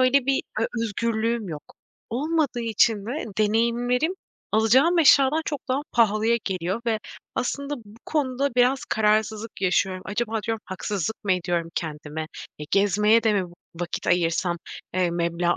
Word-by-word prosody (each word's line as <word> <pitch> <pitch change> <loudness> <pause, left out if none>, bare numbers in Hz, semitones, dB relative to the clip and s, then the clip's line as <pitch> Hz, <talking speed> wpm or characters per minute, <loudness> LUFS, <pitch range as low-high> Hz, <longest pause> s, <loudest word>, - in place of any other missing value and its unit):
öyle 255 +1 +4
bir 275 - +2 0.2
ö 225 - +2 0.2
özgürlüğüm 230 0 -1
yok. 150 -2 -6 0.5
Olmadığı 290 +1 0
için 220 -2 +2
de 275 +7 -3
deneyimlerim, 235 - +2 0.4
alacağım 260 +11 +4
eşyadan 290 0 +5
çok 290 -3 -5
daha 260 +2 +1
pahalıya 225 0 +3
geliyor 190 +2 -2
ve 225 -2 +1 0.4
aslında 280 +3 -2
bu 210 +3 -16
konuda 275 -3 0
biraz 250 +2 +3
kararsızlık 215 0 0
yaşıyorum. 185 0 +1
Acaba 220 +1 -2
diyorum, 225 -1 -2
haksızlık 195 +2 -4
mı 195 - +3
ediyorum 175 -2 -1
kendime? 155 0 -4 0.3
E, 150 - -5
gezmeye 210 +3 +4
de 220 -2 +3
mi 195 -2 +1
vı 175 - -12 0.3
vakit 175 - -4
ayırsam, 175 0 +1 0.4
eee, 180 -2 +2
meblağ 170 0 0
220 Hz, 145 wpm, -24 LUFS, 185-250 Hz, 0.5 s, eşyadan